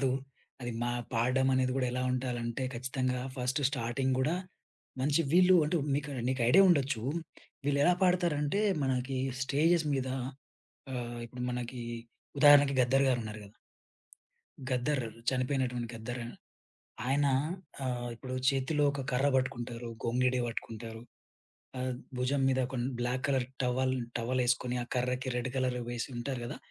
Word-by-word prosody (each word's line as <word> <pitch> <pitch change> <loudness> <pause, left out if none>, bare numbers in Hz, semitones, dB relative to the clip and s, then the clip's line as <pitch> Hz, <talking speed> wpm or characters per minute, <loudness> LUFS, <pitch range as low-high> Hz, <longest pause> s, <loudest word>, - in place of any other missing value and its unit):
రాదు. 130 -2 +2 0.5
అది 120 -1 -4
మా 120 - 0 0.2
పాడడం 130 +3 +2
అనేది 130 0 +2
గూడా 130 -1 +1
ఎలా 125 0 -1
ఉండాలంటే, 125 -1 -2
ఖచ్చితంగా 130 0 -1 0.2
ఫస్ట్ 125 +3 0
స్టార్టింగ్ 130 0 0
గూడా, 155 +7 +1 0.6
మంచి 145 +4 +2
వీళ్ళు 185 +1 +7
అంటే 170 +3 +1 0.2
మీకు 145 +1 -2 0.2
నీకు 130 -2 0
ఐడియా 195 +9 +8
ఉండొచ్చు. 135 -8 +2 0.6
వీళ్ళేలా 145 +5 +4
పాడతారంటే 175 -1 +2 0.2
మనకి 130 0 -1 0.3
స్టేజెస్ 160 +4 +2
మీద 130 -1 -1 0.8
ఆహ్, 120 -2 -4
ఇప్పుడు 125 +1 -8
మనకి 125 0 -4 0.6
ఉదాహరణకి 145 -1 +8
'గద్దర్' 135 +2 +4
గారు 125 - +2
ఉన్నారు 110 0 -6
గదా! 100 - -16 1.2
'గద్దర్' 130 +1 0 0.3
చనిపోయినటువంటి 130 -2 -1
'గద్దర్.' 120 +2 -5 0.9
ఆయన 140 +1 +3 0.6
ఆహ్, 120 -1 -2
ఇప్పుడు 130 +2 -7 0.2
చేతిలో 140 +2 +1
ఒక 140 -1 -4
కర్ర 135 +3 +2
బట్టుకుంటారు. 120 -2 -2
గొంగిడి 125 +2 +2
వట్టుకుంటారు. 115 -1 -6 0.8
ఆహ్, 130 0 -1 0.3
భుజం 135 +2 +1
మీద 130 0 +2
కొన్ 125 -2 -2
బ్లాక్ 125 +2 -1
కలర్ 130 -3 +1 0.2
టవల్ 130 +1 +1 0.2
టవలేసుకొని, 125 +1 0
ఆ - - -8
కర్రకి 125 +1 0
రెడ్ 125 +1 -1
కలర్ 130 -1 0
వేసి 120 -1 -3
ఉంటారు 120 +1 -3
గదా! - - -5
130 Hz, 135 wpm, -31 LUFS, 120-140 Hz, 1.2 s, ఐడియా